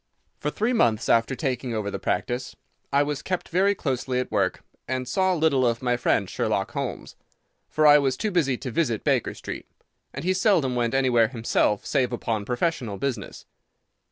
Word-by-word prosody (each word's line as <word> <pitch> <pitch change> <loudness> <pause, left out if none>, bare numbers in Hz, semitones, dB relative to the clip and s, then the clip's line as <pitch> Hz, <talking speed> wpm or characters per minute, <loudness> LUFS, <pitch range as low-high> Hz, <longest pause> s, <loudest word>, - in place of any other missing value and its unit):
For 150 - -1
three 220 +10 0
months 115 - +2
after 115 +3 +3
taking 125 -3 -2
over 105 -2 -2
the - - -4
practice 125 +1 -2 0.4
I 140 +1 +4
was 145 -1 -3
kept 185 -1 -3
very 195 +4 +2
closely 130 -4 -2
at 125 - -3
work, - - 0 0.2
and 130 0 -2
saw 185 +7 +1
little 155 -5 +2
of 120 0 0
my 125 -1 +2
friend 115 -4 +1
Sherlock - - -1
Holmes, - - -5 0.5
for 155 - +1
I 150 0 +8
was 135 -2 0
too 215 -1 -1
busy 145 -8 +1
to 125 - -6
visit 120 -7 0
Baker - - +1
Street, - - -7 0.4
and - - -6
he 185 - +3
seldom 185 - +2
went 120 +1 0
anywhere 125 -4 +4
himself 115 -3 0
save 130 -4 +1
upon 115 -3 -2
professional 120 -4 -1
business. 125 -3 -4
130 Hz, 180 wpm, -25 LUFS, 120-155 Hz, 0.5 s, I